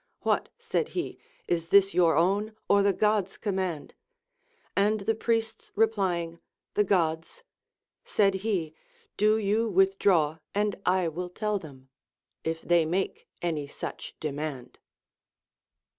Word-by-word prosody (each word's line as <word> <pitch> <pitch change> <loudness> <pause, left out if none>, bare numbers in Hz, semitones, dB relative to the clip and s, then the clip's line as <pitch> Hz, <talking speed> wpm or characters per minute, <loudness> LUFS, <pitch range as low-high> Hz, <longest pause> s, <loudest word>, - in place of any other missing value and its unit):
AVhat, - - +2
said 470 -1 -1
he, 355 - -3 0.3
is 165 -1 0
this 195 +2 +5
your 170 -3 +4
own, 200 +6 +1
or 200 0 +5
the 200 0 +4
God's 210 -1 +1
command? 185 -7 -3 0.8
And 210 +1 +2
the 220 +3 +1
priests 225 0 -2
replying, 185 -6 +1 0.3
The 210 - +3
God's; 170 - 0 0.6
said 200 -2 +2
he, 185 -8 -1 0.4
Do 215 +1 +3
you 220 +2 +1
withdraw, 190 -5 +3 0.2
and 205 0 +1
I 180 -1 +3
will 180 +3 -4
tell 210 +2 -1
them, 135 -6 -13 0.5
if 165 0 -3
they 175 -1 +4
make 175 +5 -2 0.2
any 155 -4 -1
such - - -7
demand. 145 -4 -5
190 Hz, 125 wpm, -28 LUFS, 165-210 Hz, 0.8 s, this